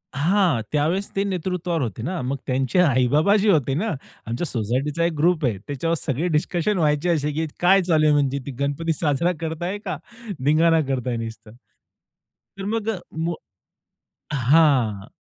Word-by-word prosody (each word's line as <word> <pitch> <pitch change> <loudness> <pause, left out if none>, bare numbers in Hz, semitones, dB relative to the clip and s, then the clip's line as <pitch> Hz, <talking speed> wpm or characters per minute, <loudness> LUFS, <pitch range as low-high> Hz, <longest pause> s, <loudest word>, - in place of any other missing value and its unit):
हां. 170 - +2
त्यावेळेस 160 +7 0
ते 195 - +1
नेतृत्वावर 180 -3 -2
होते 110 -4 -3
ना, 175 +2 -3
मग 135 +2 -2
त्यांचे 130 +6 +1
आई-बाबा 150 +4 +3
जे 205 +1 +2
होते 140 -6 +2
ना, 215 +9 -1 0.4
आमच्या 120 +9 -3
सोसायटीचा 130 +7 -1
एक 170 - 0
ग्रुप 165 0 +2
आहे. 115 -6 0
त्याच्यावर 155 +4 -1
सगळे 155 +4 -1
डिस्कशन 180 +5 -1
व्हायचे 150 +1 +1
असे, 150 -3 +1
की 160 +2 -2
काय 190 +2 +5
चालू 160 -4 +2
आहे, 150 - +5
म्हणजे 140 -1 +1
ती 140 - -5
गणपती 145 +4 -1
साजरा 155 +3 +1
करताय 165 +4 -3
का? - - -3 0.5
धिंगाणा 160 +2 +4
करताय 125 -2 -1
नुसतं 115 -1 -7 1.1
तर 195 - -5
मग 225 +1 -1 0.3
मो 165 +1 -1 1.0
हां. 130 -7 +3
155 Hz, 155 wpm, -23 LUFS, 135-175 Hz, 1.1 s, काय